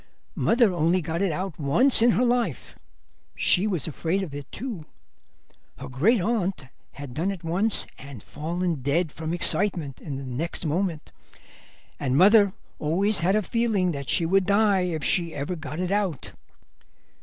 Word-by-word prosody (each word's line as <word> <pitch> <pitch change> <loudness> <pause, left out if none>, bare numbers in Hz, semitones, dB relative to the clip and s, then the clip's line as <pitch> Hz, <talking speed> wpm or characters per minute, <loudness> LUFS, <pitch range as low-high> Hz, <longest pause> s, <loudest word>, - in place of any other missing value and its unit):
Mother 230 -4 +2
only 170 +2 +2
got 165 +1 -3
it 195 -3 +1
out 180 +1 -4
once 225 - +4
in 235 - +5
her 250 - +2
life; 240 0 -1 0.6
she 190 +3 +2
was 180 -8 -2
afraid 165 +5 -2
of 160 -7 -7
it, 145 -1 -8
too. 220 - -6 0.9
Her - - -8
great 185 - +2
aunt 195 - -1 0.3
had 140 -3 -9
done 165 +8 -1
it 195 -4 -5
once 190 +7 +2
and 135 -5 -10
fallen 170 0 -3
dead 150 +5 0
from 160 +1 -5
excitement 175 -5 +1
the - - -12
next 135 +5 -4
moment, 165 0 -2 0.9
and 135 -1 0
mother 200 +2 +6 0.3
always 195 +7 +1
had 185 +4 +2
a 215 - +1
feeling 215 -5 0
that 140 -3 -6
she 165 - +2
would 190 +2 +2
die 200 -1 +3
if 160 -4 -3
she 165 +5 0
ever 145 +6 -3
got 155 0 -7
it 180 0 -2
out. 195 - -1
175 Hz, 160 wpm, -25 LUFS, 150-200 Hz, 0.9 s, mother